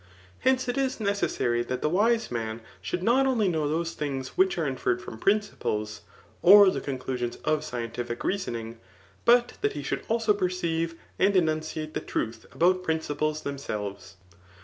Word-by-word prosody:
Hence 260 -1 +2
it 245 +2 -1
is 265 -2 -1
necessary 200 - 0
that 125 +1 -3
the - - +3
wise 220 +7 +2
rtian 115 -1 -3 0.2
should 100 - -3
not 260 +5 +4
only 230 -6 +2
know 160 -4 0
those 165 +2 -1
things 135 -4 -3
which 190 +6 +2
are 165 - 0
infer 130 -2 0
red - - -11
from 110 - -8
principles 105 - 0 0.4
[or 200 +1 +9
the - - -3
conclusions 130 -3 -3
of 155 0 +1
scientific 120 -3 -4
rea 200 - +1
soning,3 115 - -5 0.5
but 240 +1 +5
that 425 0 +1
he - - -5
should - - -2
also 225 -1 +2
perceive 170 -4 -1 0.2
and 195 +1 +3
enunciate 155 -2 0
the - - -1
truth 115 +1 -4
about 185 +2 +3
principles 155 -2 -1
themselves. 105 -9 -5
160 Hz, 165 wpm, -27 LUFS, 125-200 Hz, 0.5 s, or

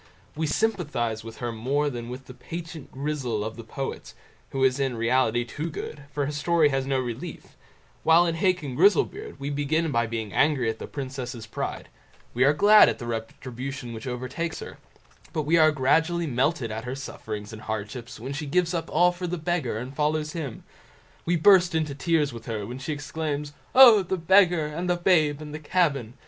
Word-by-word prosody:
We 160 +1 -1
sympathise 150 - -1
with 115 0 -9
her 120 -1 -3
more 135 +6 0
than 120 -4 -5
with 130 +2 -8
the 130 - -11
"Patient 165 +3 -8
Grizzel" 135 -6 -2
of 110 +1 -5
the 115 - -9
poets, 135 +4 -6 0.3
who 135 -1 -1
is 130 +1 +3
in 135 -3 -1
reality 120 0 +2
too 155 +6 -5
good, 150 -2 -7
for 145 -1 -1
her 145 - -3
story 155 +1 +2
has 135 -1 -1
no 135 -1 +1
relief; 130 +6 -6 0.5
while 165 +2 +5
in 165 - 0
Hacon 170 -5 0
Grizzlebeard 305 - +2
we 140 +1 -3
begin 150 +3 0
by 115 -3 +1
being 110 -3 -4
angry 140 -6 +2
at 110 - -11
the - - -6
princess's 130 -4 -6
pride; 105 - -5 0.5
we 125 - +2
are 140 - +6
glad 205 +8 +7
at - - -3
the 120 - -7
retribution 120 +2 -5
which 110 +2 -7
overtakes 130 +7 -4
her, - - -9 0.5
but 155 - -1
we 155 +3 +2
are 155 -1 +6
gradually 160 +5 +2
melted 130 -2 0
at 110 +1 -5
her 125 +1 -4
sufferings 110 -5 -7
and 110 - -9
hardships 110 +2 -6
when 130 +5 -5
she 150 +1 -4
gives 175 +4 +1
up 165 -1 -3
all 180 0 +4
for 180 0 -5
the 180 +1 -2
Beggar 160 -8 -1
and 125 +4 -6
follows 150 +1 0
him; 150 -8 -6 0.6
we 175 - +3
burst 180 0 +5
into 155 -3 0
tears 150 -1 +1
with 115 - -10
her 110 -3 -3
when 125 +4 -7
she 145 +4 -4
exclaims 150 0 -4 0.2
"Oh! 240 -5 +9
the 190 0 -2
Beggar, 175 -2 +4
and 165 +4 -4
the 175 - +2
babe, 155 -5 +2
and 150 -1 -9
the 155 - -5
cabin!" 145 - 0
145 Hz, 195 wpm, -26 LUFS, 125-165 Hz, 0.6 s, Oh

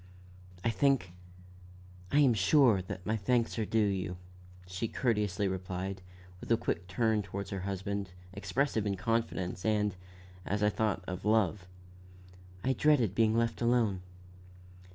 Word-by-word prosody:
"I 115 - +2
think 130 -9 +1 1.0
I - - +3
am 135 -4 +5
sure, 110 - +4
that 90 0 -7
my 110 - 0
thanks 115 +2 0
are 110 - -1
due 115 - 0
you," 95 -3 -2 0.5
she 90 +5 -3
courteously 105 -5 0
replied, 95 0 -4 0.4
with - - -7
a 115 - +5
quick 90 -3 -3
turn 110 +3 +1
toward 100 0 -6
her 100 - -3
husband, 100 0 -3 0.2
expressive 105 +3 -1
of 100 -1 -1
confidence, 95 -3 -1
and, 105 -3 +1 0.5
as 105 +2 -1
I 105 - +5
thought, 105 -4 -1
of 90 0 -5
love. 105 -3 +1 1.0
"I 130 - +2
dreaded 130 -9 +3
being 110 +1 +3
left 115 0 0
alone." 115 -6 +2
105 Hz, 140 wpm, -31 LUFS, 95-115 Hz, 1.0 s, am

